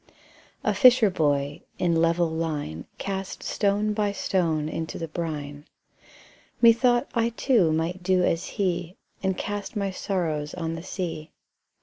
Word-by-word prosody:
A - - +2
fisher 250 -6 +6
boy, 145 -4 0 0.2
in 170 -2 +1
level 170 +1 +3
line, 150 - -3
Cast 195 -1 -4
stone 205 +1 +1
by 210 -1 0
stone 165 -6 0
into 160 +1 -4
the 165 - -4
brine: 150 -3 -5 0.9
Methought 240 +2 +5
I 230 -1 +2
too 230 - +2
might 165 +4 -1
do 185 0 +2
as 165 -1 0
he, 180 -3 -1 0.2
And 190 -2 0
cast 205 +1 -4
my 200 -2 -1
sorrows 160 -6 -2
on 165 -2 -3
the 165 - -5
sea. 170 -4 -5
175 Hz, 135 wpm, -26 LUFS, 160-200 Hz, 0.9 s, fisher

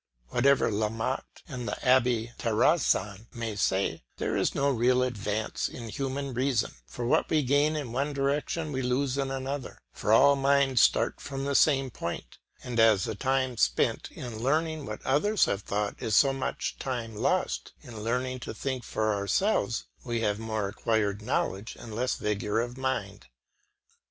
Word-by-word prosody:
Whatever 135 - +3
La 105 +1 0
Motte 115 +4 -4
and 125 -6 -5
the - - -2
Abbe 120 -2 +3
Terrasson 110 - +1
may 115 -3 -3
say, 100 -1 0 0.2
there - - -1
is - - +1
no 140 - +2
real 125 +1 +3
advance 110 -3 -2
in 115 -2 -8
human 135 +2 -3
reason, 130 0 +1 0.2
for 120 - -5
what 120 - +2
we 155 -2 +2
gain 145 +4 +2
in 145 -6 -4
one 140 +4 -1
direction 145 +3 -1
we 130 -1 -2
lose 130 +1 0
in 135 -1 0
another; 135 0 -4 0.2
for 105 - -1
all 140 +5 +7
minds 135 -3 +3
start - - +3
from 135 -1 -4
the 140 - 0
same 135 -2 +4
point, - - -6 0.2
and 120 -2 -3
as 110 -4 +5
the 110 - -2
time 130 +2 0
spent - - +1
in 120 -4 -7
learning 155 +4 0
what 105 0 -7
others 190 +11 +3
have 100 - -1
thought 105 +1 -3
is 110 - 0
so 135 -1 +5
much 135 - -3
time 120 -4 -4
lost - - 0
in 115 -3 -9
learning 125 +3 -1
to 115 - -7
think 130 0 -3
for 110 0 0
ourselves, 115 - 0 0.2
we 120 -2 -2
have 105 -1 0
more 110 -2 -2
acquired 105 0 0
knowledge 110 -2 -2
and 115 -2 -9
less 125 +4 0
vigour 105 +1 -1
of 120 +1 -3
mind. 130 -7 -3
125 Hz, 170 wpm, -28 LUFS, 110-135 Hz, 0.2 s, all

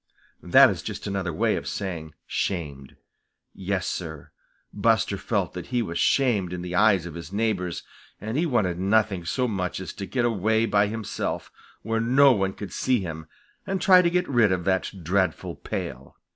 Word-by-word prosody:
That - - +6
is - - -5
just - - -6
another 95 -3 -2
way 80 - +1
of - - -5
saying 85 -6 -5
shamed. 70 -8 -3 0.6
Yes, 95 0 -2
Sir, 80 -5 -5 0.4
Buster 105 -1 +2
felt 100 -3 -2
that 90 -1 -7
he 125 -2 0
was 85 -5 -4
shamed 105 -10 +2
in 90 -1 -5
the 90 0 -5
eyes 95 -2 +4
of 85 - -7
his 85 0 -8
neighbors, 100 -5 -1 0.4
and 110 +3 -5
he 165 +4 +1
wanted 95 - 0
nothing 100 -2 +1
so 125 +8 0
much 95 -6 -2
as 95 - -6
to 100 - -6
get 120 +6 0
away 110 0 +2
by 105 -2 +2
himself, 110 0 -4 0.3
where 115 +1 -1
no 135 +4 +5
one 95 -5 0
could 100 -1 -8
see 130 -2 +1
him, 80 -3 -6 0.4
and 195 -1 -1
try 185 0 +7
to 170 - +2
get 180 +1 0
rid 120 -7 +3
of 90 -1 0
that 95 +1 +1
dreadful 90 0 0
pail. 65 +2 -6
100 Hz, 180 wpm, -25 LUFS, 90-115 Hz, 0.6 s, try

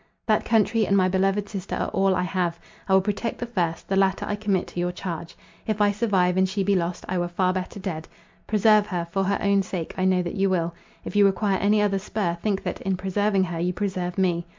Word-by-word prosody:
"That 215 -2 +2
country 220 -1 +2
and 200 - +3
my 185 -1 +4
beloved 195 +2 +1
sister 195 -2 -5
are - - -2
all 195 -1 +2
I 180 - 0
have. 175 -2 -1 0.3
I 190 - +5
will 190 - +5
protect 210 +3 -2
the 240 - -4
first—the 185 -4 -2
latter 195 0 +2
I 205 - -1
commit 205 -3 0
to - - -6
your 175 0 0
charge. 170 -2 -6 0.3
If 215 -1 -1
I 205 -1 +4
survive, 195 -4 +1
and 190 0 +3
she 195 +1 -1
be 200 +1 +2
lost, 175 -1 -2
I 185 0 -1
were 175 - 0
far 185 +1 +1
better 185 +2 -4
dead. 170 -5 -5 0.4
Preserve 215 0 +4
her—for 180 +1 -2
her 200 +1 +1
own 200 -1 +3
sake 180 -3 -5
I 185 - +2
know 185 -1 +3
that 175 - -4
you 195 0 +1
will—if 170 +2 -4
you 205 - +6
require 195 -1 +1
any 210 +1 +3
other 195 -1 +1
spur, 195 -3 -2
think 200 -3 -1
that, - - -4
in 190 -1 -1
preserving 195 +1 +1
her, 175 -2 -3
you 180 +1 0
preserve 185 -2 -3
me. 175 -2 +1
190 Hz, 230 wpm, -24 LUFS, 180-205 Hz, 0.4 s, you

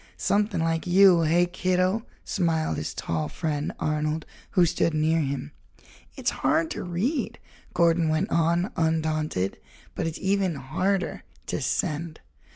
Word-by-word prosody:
"Something 205 -4 +1
like 165 +1 -1
you, 185 -1 +6
hey, 165 +2 +3
kiddo?" 185 +4 0 0.2
smiled 160 - 0
his 75 - -4
tall 80 -2 -2
friend, 150 -3 -2
Arnold, 155 +1 -1 0.2
who 180 - +4
stood 170 -1 +1
near 160 +2 +2
him. 140 - -3 0.7
"It's - - 0
hard 165 -1 +2
to - - -4
read," 215 - -2 0.4
Gordon 170 -1 +3
went 160 +7 0
on, 170 +3 +2
undaunted, 155 - 0 0.3
"but - - -2
it's 160 - -4
even 190 -3 +1
harder 185 +9 -1 0.2
to - - -3
send. 160 -3 -2
165 Hz, 135 wpm, -26 LUFS, 155-185 Hz, 0.7 s, you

